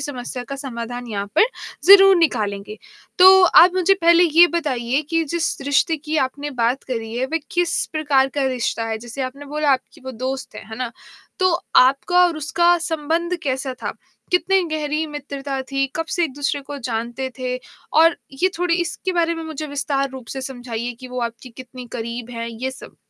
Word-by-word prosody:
समस्या 250 Hz, -2 st, -5 dB
का 275 Hz, -, -5 dB
समाधान 245 Hz, -2 st, -6 dB
यहाँ 200 Hz, -2 st, -3 dB
पर -, -, +7 dB, 0.4 s
ज़रूर 390 Hz, 0 st, +9 dB
निकालेंगे। 210 Hz, -, -1 dB, 0.4 s
तो 380 Hz, +1 st, +9 dB
आप 360 Hz, 0 st, +7 dB
मुझे 370 Hz, +1 st, +3 dB
पहले 340 Hz, +1 st, +6 dB
ये 335 Hz, +1 st, +6 dB
बताइए 260 Hz, -3 st, -1 dB
कि 330 Hz, 0 st, +1 dB
जिस 335 Hz, +2 st, -1 dB
रिश्ते 285 Hz, +3 st, +2 dB
की 310 Hz, +1 st, -4 dB
आपने 290 Hz, +2 st, -7 dB
बात 245 Hz, 0 st, 0 dB
करी 225 Hz, -3 st, -5 dB
है, 255 Hz, +2 st, -1 dB
वह 325 Hz, +4 st, -1 dB
किस 350 Hz, -1 st, 0 dB
प्रकार 285 Hz, -4 st, +2 dB
का 280 Hz, -2 st, +1 dB
रिश्ता 245 Hz, -3 st, -1 dB
है? 220 Hz, 0 st, -2 dB
जैसे 240 Hz, +4 st, -6 dB
आपने 265 Hz, +3 st, -6 dB
बोला 295 Hz, 0 st, 0 dB
आपकी 260 Hz, -1 st, -4 dB
वो 260 Hz, -, -5 dB, 0.2 s
दोस्त 265 Hz, 0 st, -5 dB
है, -, -, -9 dB
है 220 Hz, -, -6 dB
ना? 245 Hz, -2 st, -4 dB, 0.5 s
तो 370 Hz, -, +4 dB, 0.3 s
आपका 275 Hz, +8 st, +4 dB
और 335 Hz, -, -3 dB
उसका 345 Hz, +3 st, +2 dB
संबंध 330 Hz, +2 st, -1 dB
कैसा 265 Hz, -1 st, -2 dB
था? -, -, -3 dB, 0.4 s
कितनी 370 Hz, +2 st, +3 dB
गहरी 310 Hz, 0 st, -1 dB
मित्रता 280 Hz, -2 st, -5 dB
थी, 275 Hz, 0 st, +1 dB
कब 325 Hz, 0 st, -2 dB
से 350 Hz, -, +2 dB
एक-दूसरे 285 Hz, -1 st, -2 dB
को 285 Hz, +1 st, -7 dB
जानते 235 Hz, +3 st, -3 dB
थे? 255 Hz, 0 st, -2 dB, 0.4 s
और 330 Hz, +2 st, +5 dB, 0.3 s
ये 370 Hz, -, +4 dB
थोड़ी 350 Hz, -1 st, +1 dB
इसके 345 Hz, +2 st, -3 dB
बारे 335 Hz, -1 st, +1 dB
में 330 Hz, -, -6 dB
मुझे 315 Hz, -1 st, -5 dB
विस्तार 280 Hz, -1 st, -1 dB
रूप 260 Hz, -3 st, -10 dB
से 265 Hz, -, -3 dB
समझाइए 245 Hz, -2 st, -5 dB
कि 255 Hz, -, -9 dB
वो 250 Hz, 0 st, -4 dB
आपकी 235 Hz, +2 st, -5 dB
कितनी 255 Hz, -1 st, -10 dB
करीब 235 Hz, +1 st, -5 dB
हैं 230 Hz, -1 st, -5 dB
ये 240 Hz, +3 st, -4 dB
सब? 260 Hz, -, -12 dB
275 Hz, 185 wpm, -21 LUFS, 250-330 Hz, 0.5 s, ज़रूर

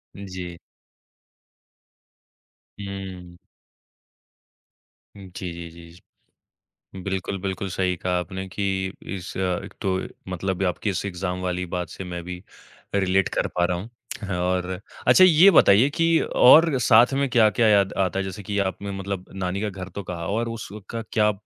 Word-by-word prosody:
जी। 90 Hz, -3 st, -7 dB, 2.2 s
हुँ। 95 Hz, -3 st, -7 dB, 1.8 s
हुँ, 100 Hz, -, -10 dB
जी, 95 Hz, -2 st, -5 dB
जी, 85 Hz, 0 st, -8 dB
जी। 85 Hz, +1 st, -17 dB, 0.8 s
बिल्कुल, 95 Hz, 0 st, -3 dB
बिल्कुल 95 Hz, 0 st, -3 dB
सही 90 Hz, 0 st, 0 dB
कहा 90 Hz, +1 st, -1 dB
आपने 95 Hz, +1 st, -5 dB
कि 100 Hz, +2 st, -3 dB, 0.5 s
इस 95 Hz, 0 st, -7 dB
एक 90 Hz, -2 st, -2 dB
तो 95 Hz, -1 st, 0 dB, 0.3 s
मतलब 95 Hz, +1 st, -2 dB
ये 95 Hz, -, +2 dB
आपकी 90 Hz, +4 st, -2 dB
इस 95 Hz, -, -2 dB
एग्ज़ाम 90 Hz, -1 st, -3 dB
वाली 90 Hz, 0 st, -2 dB
बात 90 Hz, 0 st, -4 dB
से -, -, -7 dB
मैं 90 Hz, -1 st, -5 dB
भी 90 Hz, +1 st, -7 dB, 0.5 s
रिलेट 95 Hz, -1 st, +2 dB
कर -, -, +1 dB
पा 90 Hz, 0 st, +3 dB
रहा 90 Hz, 0 st, -1 dB
हूँ 100 Hz, +6 st, -7 dB, 0.5 s
और 90 Hz, 0 st, -1 dB, 0.3 s
अच्छा, 185 Hz, -, +7 dB
ये 180 Hz, +1 st, +8 dB
बताइए 120 Hz, -, +6 dB
कि 165 Hz, +2 st, +2 dB
और 155 Hz, +3 st, +6 dB
साथ 120 Hz, +2 st, +5 dB
में 140 Hz, +1 st, +1 dB
क्या-क्या 115 Hz, -1 st, +4 dB
याद 100 Hz, -2 st, +4 dB
आता 95 Hz, 0 st, 0 dB
है? 95 Hz, -, 0 dB
जैसे 95 Hz, +2 st, -7 dB
कि 100 Hz, +2 st, -3 dB
आपने 100 Hz, +1 st, -2 dB
मतलब 95 Hz, -1 st, -4 dB
नानी 95 Hz, 0 st, -3 dB
का 105 Hz, -, -1 dB
घर 95 Hz, -1 st, -8 dB
तो 100 Hz, -, -4 dB
कहा 85 Hz, -2 st, -5 dB
और 115 Hz, +3 st, -1 dB
उसका 115 Hz, 0 st, -7 dB
क्या 105 Hz, -1 st, +3 dB
95 Hz, 150 wpm, -24 LUFS, 90-105 Hz, 2.2 s, ये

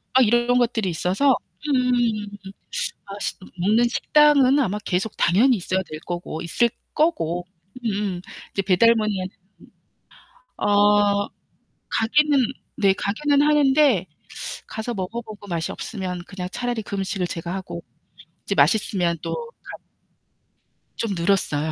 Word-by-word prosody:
막 260 Hz, -, +7 dB
이런이런 240 Hz, +2 st, +3 dB
것들이 230 Hz, -5 st, +1 dB
있어서 190 Hz, -, +2 dB, 0.3 s
음. 240 Hz, -5 st, +1 dB, 1.3 s
먹는 220 Hz, +7 st, +3 dB
식당은 290 Hz, 0 st, +4 dB
아마 210 Hz, -5 st, 0 dB
계속 190 Hz, +4 st, -1 dB
당연히 230 Hz, +8 st, +4 dB
있어야 185 Hz, 0 st, -1 dB
될 155 Hz, -, -5 dB
거고 175 Hz, -2 st, -4 dB
있을 235 Hz, +7 st, +1 dB, 0.2 s
거고. 180 Hz, -, 0 dB, 0.4 s
음, 200 Hz, -5 st, -2 dB, 0.3 s
이제 195 Hz, -, -1 dB
배달 200 Hz, +5 st, +5 dB
문의 215 Hz, -3 st, 0 dB
하 185 Hz, -, -2 dB, 1.4 s
아 205 Hz, 0 st, +4 dB, 0.6 s
가기는 290 Hz, +5 st, +3 dB, 0.4 s
네, 195 Hz, -2 st, +4 dB
가기는 280 Hz, +9 st, +1 dB
하는데 285 Hz, -, +4 dB, 0.6 s
가서 220 Hz, +2 st, -4 dB
먹어 200 Hz, +4 st, -4 dB
보고 215 Hz, -2 st, -11 dB
맛이 170 Hz, -3 st, -2 dB
없으면 185 Hz, -5 st, -5 dB
그냥 180 Hz, -2 st, -6 dB
차라리 245 Hz, -2 st, -2 dB
그 200 Hz, -, -5 dB
음식을 190 Hz, -1 st, -2 dB
제가 170 Hz, +2 st, -4 dB
하고 180 Hz, -, -6 dB, 0.7 s
이제 -, -, 0 dB
맛있으면 175 Hz, -, +2 dB
또 -, -, -3 dB, 0.3 s
가 -, -, -9 dB, 1.2 s
좀 220 Hz, -4 st, -2 dB
늘었어요. 170 Hz, -4 st, +1 dB
205 Hz, 250 characters per minute, -23 LUFS, 185-245 Hz, 1.4 s, 막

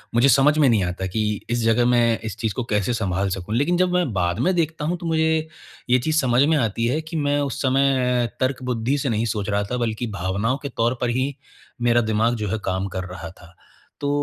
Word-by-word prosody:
मुझे 130 Hz, +4 st, +5 dB
समझ 140 Hz, +4 st, +4 dB
में 145 Hz, -3 st, +5 dB
नहीं 105 Hz, -5 st, +3 dB
आता 90 Hz, +1 st, -3 dB
कि 110 Hz, +4 st, -2 dB, 0.3 s
इस 120 Hz, 0 st, 0 dB
जगह 115 Hz, +2 st, +3 dB
मैं 120 Hz, -2 st, +3 dB
इस 110 Hz, -1 st, -5 dB
चीज़ 110 Hz, -2 st, -2 dB
को 125 Hz, -, -3 dB
कैसे 105 Hz, +3 st, +1 dB
सँभाल 95 Hz, -3 st, -1 dB
सकूँ, 95 Hz, +4 st, -4 dB
लेकिन 165 Hz, +7 st, +2 dB
जब 180 Hz, 0 st, +2 dB
मैं 180 Hz, -9 st, +1 dB
बाद 90 Hz, -2 st, 0 dB
में 185 Hz, -, +2 dB
देखता 160 Hz, -2 st, -1 dB
हूँ 175 Hz, +3 st, -1 dB
तो 170 Hz, -, -9 dB
मुझे 160 Hz, -1 st, +1 dB, 0.4 s
ये 125 Hz, +1 st, +5 dB
चीज़ 155 Hz, +5 st, +1 dB
समझ 125 Hz, -1 st, +2 dB
में 155 Hz, +1 st, +3 dB
आती 115 Hz, -2 st, 0 dB
है, 150 Hz, +6 st, 0 dB
कि 160 Hz, +1 st, -9 dB
मैं 145 Hz, -1 st, +1 dB
उस 140 Hz, -3 st, -3 dB
समय 130 Hz, -2 st, +2 dB
तर्कबुद्धि 130 Hz, 0 st, -1 dB
से 140 Hz, -2 st, -1 dB
नहीं 110 Hz, 0 st, 0 dB
सोच 105 Hz, -2 st, -2 dB
रहा 100 Hz, 0 st, +1 dB
था 125 Hz, -, 0 dB
बल्कि 120 Hz, 0 st, -2 dB
भावनाओं 100 Hz, +6 st, -1 dB
के 140 Hz, -, -3 dB
तौर 120 Hz, 0 st, 0 dB
पर 120 Hz, -, +1 dB
ही, 130 Hz, +3 st, -1 dB, 0.5 s
मेरा 120 Hz, 0 st, +3 dB
दिमाग़ 110 Hz, +2 st, +1 dB
जो 110 Hz, -2 st, -3 dB
है 110 Hz, -, -2 dB
काम 95 Hz, +1 st, -1 dB
कर 95 Hz, -, -2 dB
रहा 85 Hz, -2 st, -8 dB
था। 85 Hz, 0 st, -17 dB, 0.5 s
तो 145 Hz, -, -1 dB
120 Hz, 230 wpm, -22 LUFS, 105-140 Hz, 0.5 s, मुझे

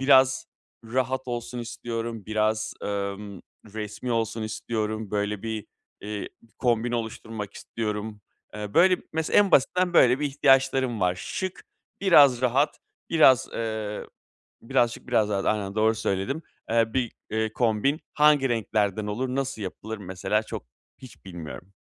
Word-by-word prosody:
biraz 130 Hz, -1 st, +5 dB, 0.4 s
rahat 130 Hz, +2 st, -1 dB
olsun 120 Hz, +1 st, -4 dB
istiyorum. 115 Hz, -2 st, -5 dB
Biraz, 110 Hz, 0 st, 0 dB
emm, 100 Hz, -1 st, -4 dB, 0.3 s
resmî 110 Hz, +3 st, -4 dB
olsun 115 Hz, -1 st, -1 dB
istiyorum. 110 Hz, -1 st, -3 dB
Böyle, 105 Hz, 0 st, -1 dB
bir, 110 Hz, -2 st, -4 dB, 0.3 s
eee, 105 Hz, 0 st, -5 dB, 0.3 s
kombin 120 Hz, -1 st, +1 dB
oluşturmak 110 Hz, -2 st, -4 dB
istiyorum. 105 Hz, -1 st, -4 dB, 0.3 s
Eee, 105 Hz, -1 st, -6 dB
böyle 180 Hz, +2 st, +6 dB
b -, -, -20 dB
mesela 160 Hz, 0 st, +2 dB
en 205 Hz, -1 st, +4 dB
basitinden 180 Hz, +6 st, +3 dB
böyle 130 Hz, -2 st, +6 dB
bir 150 Hz, -, +1 dB
ihtiyaçlarım 135 Hz, -4 st, +3 dB
var. 90 Hz, -1 st, +2 dB
Şık, 185 Hz, -, -5 dB, 0.4 s
biraz 145 Hz, -10 st, +6 dB
rahat, 135 Hz, +4 st, +2 dB, 0.3 s
biraz, 130 Hz, -6 st, +6 dB
eee, 110 Hz, -2 st, -3 dB, 0.6 s
birazcık 120 Hz, -1 st, 0 dB
biraz 110 Hz, -4 st, +2 dB
daha 100 Hz, -2 st, 0 dB
aynen 100 Hz, -2 st, -4 dB
doğru 110 Hz, +1 st, +3 dB
söyledim, 100 Hz, +11 st, -1 dB, 0.3 s
eee, 115 Hz, 0 st, +2 dB
bir, 125 Hz, -3 st, 0 dB, 0.2 s
eee, 110 Hz, 0 st, -1 dB
kombin 120 Hz, +5 st, +1 dB
hangi 150 Hz, -3 st, +5 dB
renklerden 105 Hz, -3 st, 0 dB
olur, 120 Hz, +5 st, -2 dB
nasıl 135 Hz, -5 st, -2 dB
yapılır 110 Hz, +3 st, -5 dB
mesela 100 Hz, +2 st, -1 dB
çok -, -, -6 dB, 0.3 s
hiç 130 Hz, -5 st, -14 dB
bilmiyorum. 90 Hz, +1 st, -9 dB
115 Hz, 135 wpm, -26 LUFS, 105-130 Hz, 0.6 s, böyle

